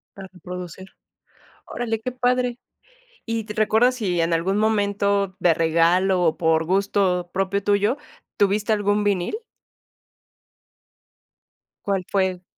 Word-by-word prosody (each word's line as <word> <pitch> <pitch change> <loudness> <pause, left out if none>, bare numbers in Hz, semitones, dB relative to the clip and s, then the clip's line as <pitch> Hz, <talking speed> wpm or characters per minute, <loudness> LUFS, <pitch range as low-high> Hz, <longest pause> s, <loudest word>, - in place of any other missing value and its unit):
Para 195 -1 -9 0.2
producir. 180 +1 -8 0.8
Órale, 225 -2 -3
qué 255 - -3
padre. 250 -1 0 0.7
¿Y 225 -1 -3
te 210 - -6
recuerdas 220 +4 +3
si 180 -7 -1
en 165 +1 0
algún 180 +5 0
momento 200 -2 +1
de 170 -2 +4
regalo 170 +3 +2
o 160 - +1
por 160 -1 +2
gusto 190 -1 +1
propio 195 +1 -1
tuyo 205 +5 +2 0.4
tuviste 205 +2 +2
algún 205 0 +1
vinil? 200 - 0 2.5
¿Cuál 195 -3 -1
fue? 185 -2 0
200 Hz, 115 wpm, -22 LUFS, 180-215 Hz, 2.5 s, de